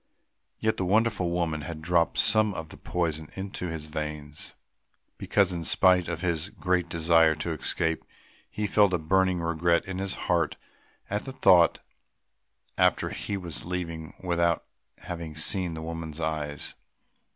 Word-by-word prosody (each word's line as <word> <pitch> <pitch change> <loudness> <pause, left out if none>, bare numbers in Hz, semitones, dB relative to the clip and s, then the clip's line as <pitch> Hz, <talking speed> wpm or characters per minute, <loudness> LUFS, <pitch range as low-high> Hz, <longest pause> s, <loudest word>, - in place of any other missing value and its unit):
Yet 110 0 0
the - - -1
wonderful 105 -1 +2
woman 85 -3 -1
had 80 +3 -5
dropped 85 -1 +2
some 110 -2 +3
of 80 -1 -6
the - - -8
poison 80 -3 -2
into 95 -1 -4
his 80 -2 -5
veins, 75 -1 -6 0.6
because, 100 -3 +2
in 85 -1 -3
spite 90 +1 +4
of 85 -1 -3
his 85 0 -1
great 90 -3 0
desire 80 -1 +4
to 80 +2 -3
escape, 80 +1 0 0.5
he 105 - -3
felt 100 -2 +4
a - - +2
burning 95 +2 +2
regret 85 +1 +1
in 95 -1 -4
his 95 0 -2
heart 85 -3 +1 0.5
at 105 +1 -3
the 135 - -5
thought 90 -9 +5 1.0
that - - +4 0.2
he 100 - -3
was 85 -4 -6
leaving 85 -3 -5
without 85 -2 +1 0.3
having 85 -3 -7
seen 85 +2 +1
the 80 - -6
woman's 80 -1 -6
eyes. 75 -3 -3
85 Hz, 150 wpm, -27 LUFS, 80-90 Hz, 1.0 s, thought